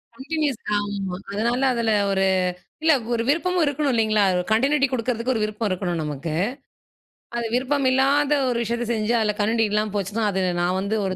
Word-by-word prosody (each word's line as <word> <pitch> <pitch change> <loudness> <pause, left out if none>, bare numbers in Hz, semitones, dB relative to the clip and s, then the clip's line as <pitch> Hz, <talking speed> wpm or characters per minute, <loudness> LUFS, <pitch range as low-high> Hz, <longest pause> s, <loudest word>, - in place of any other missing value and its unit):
Continuous. 290 -1 -2 0.2
ஆமா. 200 -3 -3
அதனால, 235 +5 0
அதுல 230 -2 0 0.2
ஒரு 195 0 +1 0.6
இல்ல 320 0 +5 0.2
ஒரு 230 -1 0
விருப்பமும் 350 +3 +2
இருக்கணும் 290 0 0
இல்லீங்களா? 215 -2 +2
ஒரு 180 - 0
கன்டியுனிடி 275 +5 +3
குடுக்கறதுக்கு 245 0 -1
ஒரு 225 - -1
விருப்பம் 215 +1 -2
இருக்கணும் 180 -2 -2
நமக்கு. 150 +1 -4 1.0
அது 235 - -2
விருப்பமில்லாத 270 +2 +2 0.2
ஒரு 245 - 0
விஷயத்தச் 235 +1 -2
செஞ்சா 225 +1 +1
அதுல 210 -1 0
கன்டியுனிடி 220 +1 +2
இல்லாம 210 0 0
போச்சுனா, 205 +3 -2
அது 190 0 -1 0.2
நான் 180 +1 +1
வந்து 200 +3 -1
ஒரு 190 -1 -2
230 Hz, 160 wpm, -23 LUFS, 205-265 Hz, 1.0 s, இல்ல